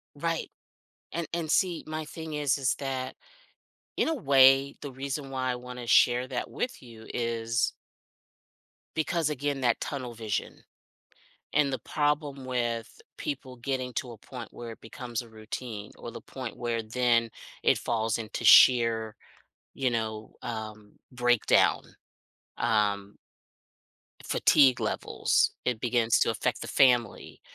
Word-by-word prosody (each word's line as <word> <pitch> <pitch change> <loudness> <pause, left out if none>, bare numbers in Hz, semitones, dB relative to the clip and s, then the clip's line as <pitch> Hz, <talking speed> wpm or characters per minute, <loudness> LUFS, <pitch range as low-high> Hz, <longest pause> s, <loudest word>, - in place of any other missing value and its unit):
Right, 165 +2 -2 0.6
and 170 -2 -3
and 165 -2 -2
see 180 -4 +2
my 155 0 -4
thing 160 0 -7
is 145 -2 +1
is 130 -2 +1
that 130 -2 -3 0.8
in - - +2
a 325 - +1
way 135 - +5
the 145 - -6
reason 135 +2 -4
why 130 -1 -1
I 125 - -2
wanna 125 0 -8
share 120 +3 +4
that 125 -2 -3
with 250 - -4
you 115 -3 -13
is 115 -1 0 1.2
Because 160 0 0
again, 145 -1 -2
that 120 -2 +2
tunnel 130 -5 -4
vision, 110 -2 -4 0.9
and 145 -2 +2
the 130 - -1
problem 145 -2 -1
with 120 -2 -3 0.2
people 130 -3 -5
getting 130 0 -3
to 125 - -3
a 115 - -12
point 120 +1 -9
where 120 -1 -7
it - - -14
becomes 120 +1 -5
a 120 - -14
routine, 110 -1 -7
or 120 - -7
the 115 - -9
point 130 -3 -7
where 115 -1 -2
then 115 0 +2 0.3
it - - +4
falls 115 -2 -1
into 110 -2 -5
sheer, 115 -3 +6 0.6
you 130 -2 0
know, 110 -2 -3
um, 110 -3 -6 0.2
breakdown, 120 -2 +3 0.8
um 100 -2 0 1.1
fatigue 135 -5 +4
levels, - - +1
it 125 -3 0
begins 120 -2 +2
to - - +3
affect - - -1
the - - -5
family, 125 -4 +2
125 Hz, 135 wpm, -28 LUFS, 115-140 Hz, 1.2 s, sheer